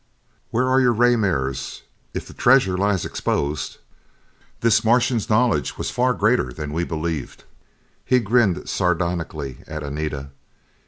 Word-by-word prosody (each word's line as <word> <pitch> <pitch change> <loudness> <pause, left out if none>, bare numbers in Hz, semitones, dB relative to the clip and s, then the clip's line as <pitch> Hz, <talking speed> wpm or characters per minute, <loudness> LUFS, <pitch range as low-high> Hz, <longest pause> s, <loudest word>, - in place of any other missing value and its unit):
"Where 125 +3 +1
are 130 +1 +4
your 125 -2 +4
ray 120 +2 +4
mirrors? 70 - -2 0.3
If - - -4
the - - -11
treasure 120 -7 +4
lies 100 -1 +1
exposed 70 0 -2 0.4
" - - -35
This 115 -1 +3
Martian's 120 0 +2
knowledge 110 - +2
was - - -3
far 125 0 +1
greater 110 - +2
than 75 +3 -6
we 85 +2 0
believed. 80 -3 -4 0.6
He 130 - +3
grinned 110 -4 +1
sardonically 85 -6 -2
at 75 -1 -6
Anita. 70 -1 -4
95 Hz, 140 wpm, -22 LUFS, 75-120 Hz, 0.6 s, are